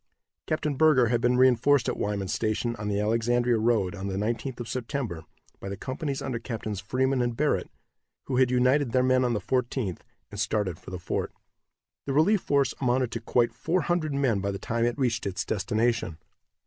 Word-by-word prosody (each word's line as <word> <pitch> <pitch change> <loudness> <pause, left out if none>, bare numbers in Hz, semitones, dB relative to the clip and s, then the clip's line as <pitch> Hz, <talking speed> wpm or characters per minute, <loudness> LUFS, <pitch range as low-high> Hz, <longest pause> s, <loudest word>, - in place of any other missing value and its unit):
Captain 155 -1 -1
Burger 135 -5 +4
had 120 0 +1
been 125 +1 +3
reinforced 130 +1 +4
at - - 0
Wyman's 100 -2 -2
station, 115 +2 -1
on 105 0 -5
the 100 -1 0
Alexandria 115 +2 +1
road, 110 -5 +1
on 100 -1 -5
the 95 - -3
19th 115 +5 -2
of 120 - -5
September, 115 - -4 0.3
by 100 - -6
the 100 - -5
companies 140 +1 -4
under 125 -3 -3
Captains 110 -3 -5
Freeman 130 +5 0
and 120 -1 -1
Barrett, 150 0 0 0.5
who 130 - -2
had 130 -1 +4
united 125 +1 +2
their 130 -1 +3
men 130 0 +3
on 120 -1 +1
the 105 - 0
14th, 120 - -1 0.3
and - - -7
started 100 -6 -1
for - - -11
the 90 - -5
fort. 85 - -3 0.8
The 135 - -1
relief 170 +8 +4
force 140 -3 +1
amounted 125 -1 +1
to 115 - -4
quite 120 +1 +1
four 180 +2 0
hundred 165 -5 -1
men 130 -7 +1
by 100 +1 -2
the 100 - -3
time 115 +3 -1
it 120 0 -1
reached 120 -6 0
its 95 -1 -3
destination. 110 -3 0
120 Hz, 195 wpm, -27 LUFS, 105-130 Hz, 0.8 s, Burger